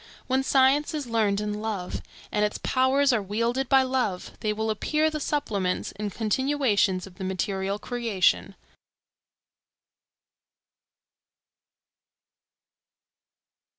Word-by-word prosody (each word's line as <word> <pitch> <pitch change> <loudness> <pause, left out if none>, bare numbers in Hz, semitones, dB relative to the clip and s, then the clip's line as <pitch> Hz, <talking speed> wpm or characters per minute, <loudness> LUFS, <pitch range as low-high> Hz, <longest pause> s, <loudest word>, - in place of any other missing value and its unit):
When 260 +1 +1
science 270 +3 +3
is 295 -2 -3
learned 220 -4 +1
in 210 0 -3
love, 205 -5 -3 0.3
and 210 - +1
its 210 - 0
powers 265 +1 +2
are 225 - +2
wielded 230 +6 -1
by 265 -1 +6
love, 255 -8 -1
they 215 - 0
will 220 +1 -1
appear 305 +8 +1
the 305 - -3
supplements 205 -11 -1
and 205 0 -5
continuations 220 -4 +1
of 185 -2 -15
the - - -4
material 190 +1 -2
creation. 230 -4 0
220 Hz, 105 wpm, -26 LUFS, 200-265 Hz, 0.3 s, by